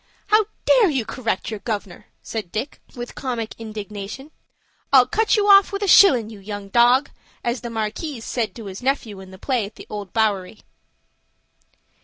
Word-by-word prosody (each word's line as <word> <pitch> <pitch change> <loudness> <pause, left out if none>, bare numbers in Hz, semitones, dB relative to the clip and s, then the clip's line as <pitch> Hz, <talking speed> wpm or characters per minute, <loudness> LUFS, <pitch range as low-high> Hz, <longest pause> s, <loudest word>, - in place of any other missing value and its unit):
"How 430 -1 +4 0.2
dare 475 -6 +5
you 265 -7 -1
correct 225 -4 -3
your 215 - -5
gov'nor?" 205 -2 -5 0.2
said 210 -6 -5
Dick, 250 +7 -4
with 240 0 -7
comic 240 -4 -4
indignation. 215 +5 -7 0.6
"'I'll 260 -2 +7
cut 440 - +1
you 410 -1 +2
off 395 -1 +7
with 400 +1 -3
a - - 0
shillin', 250 - +6
you 210 - -11
young 200 0 -7
dog,' 245 +5 +4 0.3
as 240 +1 -2
the 235 - -5
Markis 225 +4 -4
says 230 -4 -1
to 230 - -9
his 195 +2 -8
nephew 250 -6 -1
in 190 -1 -11
the 190 - -12
play 250 +2 -1
at 210 - -15
the - - -11
Old 205 -3 -6
Bowery." 210 -3 -1
230 Hz, 175 wpm, -22 LUFS, 210-270 Hz, 0.6 s, I'll